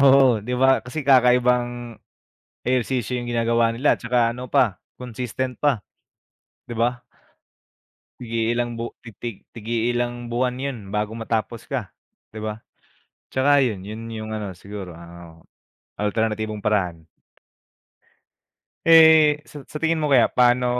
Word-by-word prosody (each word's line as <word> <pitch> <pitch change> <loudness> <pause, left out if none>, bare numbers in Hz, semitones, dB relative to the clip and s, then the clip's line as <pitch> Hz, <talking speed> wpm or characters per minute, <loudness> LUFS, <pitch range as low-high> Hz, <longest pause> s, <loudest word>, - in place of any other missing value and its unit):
oo, 135 -1 +7
di 125 +4 -3
ba 130 +1 +4
kasi 135 +5 -5
kakaibang 125 -2 +3 0.7
ehersisyo 125 0 0
yung 120 0 -5
ginagawa 115 0 +2
nila 125 +6 +2
tsaka 115 -1 +1
ano 125 +1 -7
pa 125 -10 +2 0.2
consistent 125 0 -4
pa, 140 -8 +2 0.9
di - - -4
ba? 120 +1 0 1.2
Tig-iilang 120 0 -1
bu 115 - -3 0.4
tig 115 -4 -6
tig-iilang 120 +2 -1 0.2
buwan 125 +1 0
yun 140 -2 -3 0.2
bago 105 +1 -1
matapos 115 0 -3
ka 130 -8 -4 0.4
di - - -6
ba? 110 +1 -5 0.7
Tsaka 140 +2 +3
yun, 105 -6 -4
yun 110 +3 -7
yung 110 0 -6
ano 105 -3 -4
siguro 95 -1 -8
ano, 85 +1 -12 0.8
ah, 105 - -2
alternatibong 110 -1 -2
paraan. 90 -6 -1 1.8
Eh, 160 -2 +7
sa 145 -2 -10
sa 150 - -8
tingin 165 0 +2
mo 150 -2 0
kaya 125 -3 +6
paano 125 0 +3
120 Hz, 125 wpm, -23 LUFS, 110-130 Hz, 1.8 s, oo